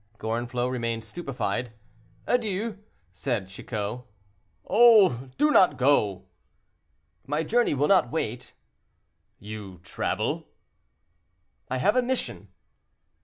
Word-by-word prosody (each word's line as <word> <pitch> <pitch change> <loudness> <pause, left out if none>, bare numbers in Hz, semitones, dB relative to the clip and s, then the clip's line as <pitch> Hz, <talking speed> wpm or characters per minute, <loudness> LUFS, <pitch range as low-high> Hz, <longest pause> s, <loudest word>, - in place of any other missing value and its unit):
Gorenflot 120 +3 -2
remained 115 -2 -2
stupefied. 125 -4 -4 0.5
"Adieu," 220 -2 -1 0.3
said 105 -1 -2
Chicot. 105 +3 -5 0.7
"Oh! 205 - +5
do 300 0 +3
not 180 - +5
go." 105 -8 +2 1.0
"My 150 +3 0
journey 235 0 +2
will 145 +2 +2
not 195 -2 +4
wait." 125 -6 -4 0.8
"You 105 -3 -9
travel?" 90 - -2 1.2
"I 130 - -1
have 205 - +2
a 255 - +4
mission." 255 +1 -3
130 Hz, 95 wpm, -26 LUFS, -, 1.2 s, Oh